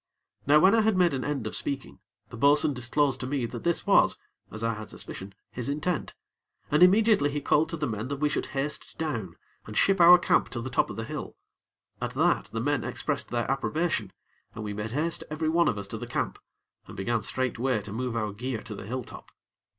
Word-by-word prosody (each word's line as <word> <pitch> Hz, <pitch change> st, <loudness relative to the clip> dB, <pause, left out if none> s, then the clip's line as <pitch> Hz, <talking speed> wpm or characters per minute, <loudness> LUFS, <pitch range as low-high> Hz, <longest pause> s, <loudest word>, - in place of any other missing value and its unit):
Now 145 Hz, +1 st, +7 dB
when 190 Hz, +6 st, +6 dB
I 225 Hz, -, +5 dB
had 215 Hz, -3 st, +2 dB
made 175 Hz, -3 st, +4 dB
an 130 Hz, -2 st, -2 dB
end 140 Hz, -6 st, -2 dB
of 110 Hz, -, -1 dB
speaking, 140 Hz, -8 st, -2 dB, 0.3 s
the -, -, -9 dB
bo'sun 145 Hz, +4 st, +4 dB
disclosed 130 Hz, +2 st, 0 dB
to 125 Hz, -, -4 dB
me 135 Hz, -2 st, -1 dB
that 120 Hz, 0 st, -7 dB
this 170 Hz, -1 st, 0 dB
was, -, -, +4 dB, 0.3 s
as 110 Hz, +1 st, -6 dB
I 115 Hz, 0 st, +1 dB
had 110 Hz, -1 st, -8 dB
suspicion, 95 Hz, +1 st, -8 dB, 0.2 s
his 125 Hz, +1 st, -3 dB
intent, 150 Hz, +3 st, -2 dB, 0.6 s
and 150 Hz, +3 st, +3 dB
immediately 195 Hz, -4 st, +5 dB
he 145 Hz, +1 st, -2 dB
called 150 Hz, +3 st, +2 dB
to 165 Hz, -, -4 dB
the 150 Hz, -, -1 dB
men 110 Hz, -1 st, -3 dB
that 140 Hz, -, -3 dB
we 150 Hz, +2 st, +1 dB
should 145 Hz, -, -2 dB
haste 140 Hz, +2 st, -4 dB
down, 115 Hz, -, -3 dB, 0.3 s
and 105 Hz, -, -6 dB
ship 195 Hz, -2 st, +4 dB
our 175 Hz, +1 st, +10 dB
camp 175 Hz, -, +2 dB
to 120 Hz, -, -4 dB
the 130 Hz, -, -5 dB
top -, -, +2 dB
of -, -, -6 dB
the 115 Hz, -, -4 dB
hill. -, -, -6 dB, 0.7 s
At -, -, -3 dB
that, -, -, +2 dB
the 115 Hz, -, -4 dB
men 145 Hz, -1 st, 0 dB
expressed -, -, -3 dB
their 120 Hz, -1 st, -1 dB
approbation, 135 Hz, -, -1 dB, 0.4 s
and 110 Hz, -, -5 dB
we 105 Hz, -1 st, -4 dB
made 105 Hz, +2 st, -4 dB
haste 155 Hz, +7 st, -2 dB
every 155 Hz, +1 st, -1 dB
one 170 Hz, +1 st, +3 dB
of 105 Hz, -, +1 dB
us 100 Hz, -, -4 dB
to -, -, -5 dB
the -, -, -6 dB
camp, -, -, -2 dB, 0.5 s
and -, -, -11 dB
began 110 Hz, +4 st, 0 dB
straightway 125 Hz, 0 st, -1 dB
to 105 Hz, -, -8 dB
move 125 Hz, +1 st, -3 dB
our 110 Hz, -3 st, -2 dB
gear 120 Hz, +1 st, -4 dB
to 115 Hz, -, -7 dB
the 100 Hz, -, -8 dB
hilltop. 125 Hz, +1 st, -7 dB
130 Hz, 220 wpm, -27 LUFS, 115-155 Hz, 0.7 s, our